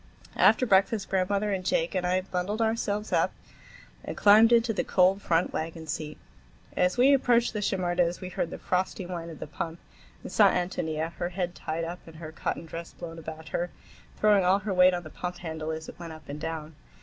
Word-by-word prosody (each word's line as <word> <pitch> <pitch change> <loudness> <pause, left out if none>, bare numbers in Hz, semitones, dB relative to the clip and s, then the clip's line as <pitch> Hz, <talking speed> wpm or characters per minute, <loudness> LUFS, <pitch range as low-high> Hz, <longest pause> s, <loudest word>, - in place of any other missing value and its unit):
After 255 - +5
breakfast 195 -1 +2
grandmother 200 +2 +1
and 190 -2 -2
Jake 165 -2 0
and 180 -2 0
I 185 +1 +2
bundled 185 +3 -3
ourselves 220 -2 -1
up - - +2 0.7
and - - -6
climbed 215 +3 +7
into 230 -1 +4
the - - -1
cold 190 +2 +3
front 170 -1 +1
wagon 160 0 -4
seat. 155 -1 -5 0.6
As 180 +5 +2
we 265 +3 +6
approached 240 -3 +3
the 210 - -2
Shimerdas' 175 -3 0
we 185 - -6
heard 175 - -2
the - - -6
frosty 185 +1 -1
whine 170 -2 -5
of 160 - -9
the - - -6
pump 165 +2 -5 0.5
and - - -7
saw - - +6
Ántonia, 160 -3 -2
her 175 - -3
head 180 -1 -3
tied 165 -1 -4
up 170 +2 -5
and 165 - -12
her 155 -1 -8
cotton 160 - -4
dress 165 +1 -8
blown 165 -1 -8
about 160 0 -8
her, 175 +1 -2 0.5
throwing 210 -2 +4
all 185 +2 +4
her 200 0 -3
weight 180 0 +6
on 175 - -4
the 155 - -10
pump 180 0 -5
handle 160 -2 -5
as 160 0 -4
it - - -11
went 170 -2 -7
up 155 0 -13
and 145 +1 -7
down. 160 -1 -5
180 Hz, 210 wpm, -28 LUFS, 165-200 Hz, 0.7 s, climbed